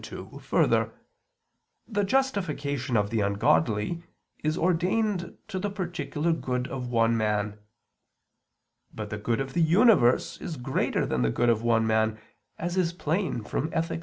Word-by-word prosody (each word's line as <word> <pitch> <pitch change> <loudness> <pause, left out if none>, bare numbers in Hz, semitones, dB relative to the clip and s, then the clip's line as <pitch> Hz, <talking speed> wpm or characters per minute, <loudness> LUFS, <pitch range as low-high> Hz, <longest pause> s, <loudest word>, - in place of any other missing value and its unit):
2: - - -9
Further, - - +2 0.9
the 205 -3 0
justification 155 - 0
of 105 0 0
the 115 - +1
ungodly 105 +6 +1 0.4
is 155 +2 0
ordained 185 +2 0
to 185 - -3
the 205 +2 -1
particular 175 -4 -2
good 125 -5 -2
of 130 -2 -4
one 115 -1 +3
man. 105 -1 -1 1.3
But 105 -1 -7
the 105 - -3
good 115 +3 0
of 135 0 -3
the 170 - +1
universe 170 - +4
is 160 - -5
greater 130 +2 0
than 65 - -1
the 60 - +2
good 120 - +1
of 115 -2 +2
one 115 -1 +2
man, 110 0 +1 0.4
as 175 +2 -3
is 175 -2 +1
plain 165 - -1
from 145 +8 -2
_Ethic. 165 0 -2
135 Hz, 150 wpm, -27 LUFS, 115-175 Hz, 1.3 s, universe